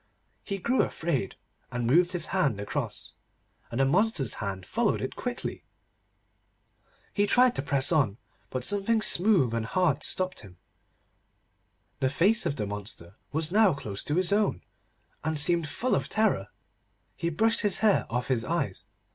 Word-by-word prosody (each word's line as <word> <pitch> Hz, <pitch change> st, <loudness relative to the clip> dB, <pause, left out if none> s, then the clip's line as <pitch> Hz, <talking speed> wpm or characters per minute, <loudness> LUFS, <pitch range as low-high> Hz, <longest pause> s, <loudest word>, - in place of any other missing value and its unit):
He 200 Hz, -, -3 dB
grew 240 Hz, +7 st, +1 dB
afraid, 140 Hz, -, -2 dB, 0.4 s
and 120 Hz, -1 st, -2 dB
moved 175 Hz, +9 st, +3 dB
his 170 Hz, -2 st, +1 dB
hand 145 Hz, -, +1 dB
across, 100 Hz, -, -4 dB, 0.6 s
and 120 Hz, -, -4 dB
the 135 Hz, -, +4 dB
monster's 170 Hz, -, +2 dB
hand 95 Hz, -3 st, -4 dB
followed -, -, 0 dB
it -, -, -4 dB
quickly. -, -, -5 dB, 1.5 s
He 205 Hz, 0 st, +2 dB
tried 250 Hz, +1 st, +5 dB
to -, -, -2 dB
press 140 Hz, +1 st, +1 dB
on, 130 Hz, -11 st, +2 dB, 0.3 s
but 130 Hz, -1 st, -4 dB
something 205 Hz, -, +1 dB
smooth 175 Hz, -, +4 dB
and 115 Hz, -1 st, -1 dB
hard 155 Hz, +3 st, +1 dB
stopped 185 Hz, 0 st, 0 dB
him. 90 Hz, -3 st, -11 dB, 1.4 s
The 130 Hz, -, +1 dB
face 190 Hz, -, +2 dB
of 145 Hz, -, -2 dB
the 105 Hz, -, -2 dB
monster 100 Hz, -3 st, -7 dB, 0.2 s
was 155 Hz, +2 st, 0 dB
now 205 Hz, -5 st, +4 dB
close 105 Hz, -7 st, -5 dB
to 150 Hz, -, -1 dB
his 185 Hz, +2 st, +2 dB
own, 210 Hz, 0 st, +1 dB, 0.6 s
and 155 Hz, 0 st, -1 dB
seemed 160 Hz, +1 st, +2 dB
full 245 Hz, +12 st, -1 dB
of -, -, 0 dB
terror. 210 Hz, -, +1 dB, 0.7 s
He 170 Hz, -, -2 dB
brushed 225 Hz, +8 st, +1 dB
his 205 Hz, -3 st, +1 dB
hair 210 Hz, -, +3 dB
off 125 Hz, +2 st, -2 dB
his 125 Hz, -4 st, 0 dB
eyes. -, -, -2 dB
155 Hz, 155 wpm, -28 LUFS, 120-195 Hz, 1.5 s, tried